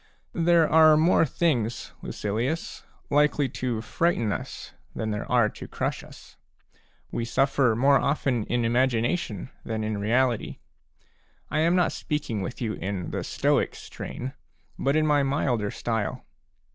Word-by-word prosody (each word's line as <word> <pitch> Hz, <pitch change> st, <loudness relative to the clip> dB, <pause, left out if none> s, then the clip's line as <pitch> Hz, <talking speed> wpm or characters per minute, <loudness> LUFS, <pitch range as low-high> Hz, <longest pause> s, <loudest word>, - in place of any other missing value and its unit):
There 170 Hz, -1 st, +4 dB
are 155 Hz, -1 st, +6 dB
more 165 Hz, 0 st, +4 dB
things, 120 Hz, -9 st, -1 dB
Lucilius, 115 Hz, +10 st, -3 dB, 0.3 s
likely 145 Hz, -1 st, +3 dB
to 120 Hz, -2 st, -3 dB
frighten 140 Hz, -5 st, 0 dB
us -, -, -6 dB, 0.2 s
than 110 Hz, -1 st, -2 dB
there 105 Hz, +1 st, -4 dB
are 120 Hz, -3 st, +4 dB
to -, -, -10 dB
crush -, -, -3 dB
us; -, -, -15 dB, 0.7 s
we 115 Hz, -, -2 dB
suffer 130 Hz, 0 st, +2 dB
more 135 Hz, +4 st, +4 dB
often 135 Hz, -6 st, 0 dB
in 120 Hz, -1 st, 0 dB
imagination 120 Hz, -, 0 dB
than 110 Hz, -1 st, -3 dB
in 110 Hz, -1 st, -2 dB
reality. 120 Hz, +3 st, +1 dB, 0.9 s
I 155 Hz, -, +1 dB
am 165 Hz, +3 st, +3 dB
not 180 Hz, -2 st, +3 dB
speaking 145 Hz, -9 st, -3 dB
with 120 Hz, +7 st, -5 dB
you 110 Hz, -2 st, -1 dB
in 95 Hz, -3 st, -4 dB
the -, -, -3 dB
Stoic -, -, +1 dB
strain 130 Hz, +2 st, -7 dB, 0.5 s
but 140 Hz, +2 st, +1 dB
in 155 Hz, 0 st, +3 dB
my 145 Hz, -1 st, +3 dB
milder 135 Hz, -6 st, 0 dB
style. 110 Hz, -2 st, -3 dB
125 Hz, 140 wpm, -26 LUFS, 110-150 Hz, 0.9 s, are